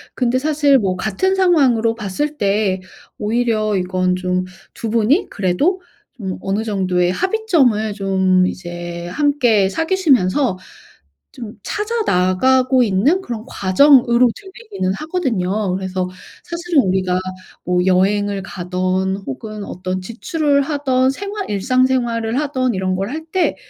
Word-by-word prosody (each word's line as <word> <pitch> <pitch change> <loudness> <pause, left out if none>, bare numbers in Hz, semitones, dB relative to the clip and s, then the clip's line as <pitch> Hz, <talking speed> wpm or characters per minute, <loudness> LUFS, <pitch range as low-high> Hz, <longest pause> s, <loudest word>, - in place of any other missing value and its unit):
근데 250 0 +1
사실 290 -1 +3
뭐 190 -4 -1
같은 215 - 0
상황으로 265 -12 +3
봤을 265 +8 -3
때 200 -1 +1 0.4
오히려 215 -1 0
이건 185 0 0
좀 185 0 -1 0.3
2 230 - -5
분이 235 - +2
그래도 245 - 0 0.3
좀 190 -6 -5
어느 200 +3 -1
정도의 185 -4 0
합의점을 305 - +1
좀 190 -2 +2
이제 175 -1 -6
함께 250 -6 +2
사귀시면서 275 - +1 0.8
좀 225 -3 -9
찾아 445 +2 -2
나가고 255 - +3
있는 235 - +2
그런 235 -10 -6
과정으로 245 +4 +4
들리기는 395 - -5
하거든요. 215 - -1
그래서 185 -1 -3 0.3
사실은 340 -2 0
우리가 185 -1 0 0.4
뭐 180 +1 +1
여행을 200 +2 +1
가든 185 +1 -2
혹은 210 - -6
어떤 185 -1 -4
지출을 280 - 0
하든 270 -3 +1
생활 400 +7 -5
일상생활을 240 +1 +1
하든 260 -5 -1
이런 185 -1 -1
걸 195 +3 -3
할 315 +3 -5
때 375 +1 +1
220 Hz, 265 characters per minute, -18 LUFS, 185-280 Hz, 0.8 s, 과정으로